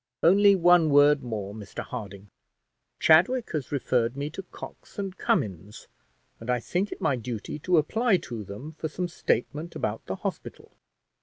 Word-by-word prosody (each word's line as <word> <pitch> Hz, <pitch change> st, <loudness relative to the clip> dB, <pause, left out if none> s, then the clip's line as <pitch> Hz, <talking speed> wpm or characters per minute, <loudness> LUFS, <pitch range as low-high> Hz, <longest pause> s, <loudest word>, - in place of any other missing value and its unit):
"Only 200 Hz, +4 st, +6 dB
one 175 Hz, -3 st, +5 dB
word 145 Hz, 0 st, +5 dB
more, 105 Hz, -5 st, -5 dB
Mr 105 Hz, -2 st, -7 dB
Harding. 100 Hz, -4 st, -8 dB, 0.7 s
Chadwick 190 Hz, +10 st, +4 dB
has 150 Hz, -5 st, -3 dB
referred 125 Hz, -3 st, 0 dB
me 145 Hz, +2 st, -3 dB
to 195 Hz, -, -6 dB
Cox 190 Hz, -, -12 dB
and 195 Hz, -2 st, -4 dB
Cummins, 100 Hz, -, -2 dB, 0.5 s
and 115 Hz, -, -9 dB
I 125 Hz, 0 st, +2 dB
think 180 Hz, -, -2 dB
it -, -, -7 dB
my 140 Hz, -, +2 dB
duty 120 Hz, +3 st, -5 dB
to 180 Hz, +3 st, +2 dB
apply 220 Hz, +7 st, +2 dB
to 120 Hz, -10 st, -7 dB
them 105 Hz, +10 st, -8 dB
for 160 Hz, 0 st, -5 dB
some 180 Hz, +4 st, -3 dB
statement 160 Hz, 0 st, -2 dB
about 105 Hz, +1 st, -3 dB
the -, -, -2 dB
hospital. -, -, -6 dB
145 Hz, 160 wpm, -27 LUFS, 115-175 Hz, 0.7 s, Only